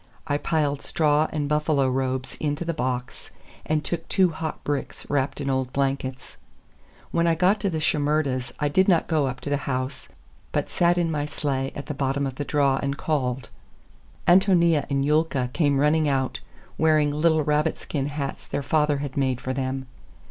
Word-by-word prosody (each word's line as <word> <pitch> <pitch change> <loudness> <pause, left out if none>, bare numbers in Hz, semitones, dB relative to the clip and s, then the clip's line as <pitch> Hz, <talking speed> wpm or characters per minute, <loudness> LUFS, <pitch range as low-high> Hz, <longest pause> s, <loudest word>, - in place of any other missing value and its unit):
I 145 -2 0
piled 145 -4 0
straw 150 -1 +2
and 150 -2 -1
buffalo 150 -2 +2
robes 130 0 -2
into 150 +2 -2
the 170 - -1
box, 125 -4 -3 0.4
and 155 -1 +1
took 165 +1 -3
two 185 -3 +3
hot 160 0 -5
bricks 145 -1 -3
wrapped 140 -1 0
in 140 - -3
old 130 -2 0
blankets. 135 -1 -2 0.7
When 170 0 +2
I 165 - +3
got 185 +5 +3
to 200 - 0
the 160 -3 -2
Shimerdas' 145 -5 0
I 145 - +1
did 185 +6 +3
not 175 -4 +4
go 155 -4 +1
up 130 0 -5
to 145 - -4
the 145 - +2
house, 130 0 -3 0.4
but - - -1
sat 175 0 +3
in 170 -2 +1
my 150 -2 -1
sleigh 135 -3 -2
at 140 - -6
the 150 - -4
bottom 140 0 -1
of 135 - -3
the 145 - -4
draw 140 -2 +2
and 140 0 -2
called. 130 -6 -1 0.8
Ántonia 175 -4 +4
and 140 -1 +1
Yulka 145 -4 +1
came 145 -4 +2
running 150 +1 +3
out, 135 -2 0 0.4
wearing 155 -2 +4
little 155 +1 +2
rabbit 150 +2 +1
skin 140 -2 -3
hats 145 -1 -5
their 140 - -3
father 150 0 +2
had 135 - -7
made 130 -3 0
for 130 - -3
them. 130 0 -2
145 Hz, 185 wpm, -25 LUFS, 135-155 Hz, 0.8 s, not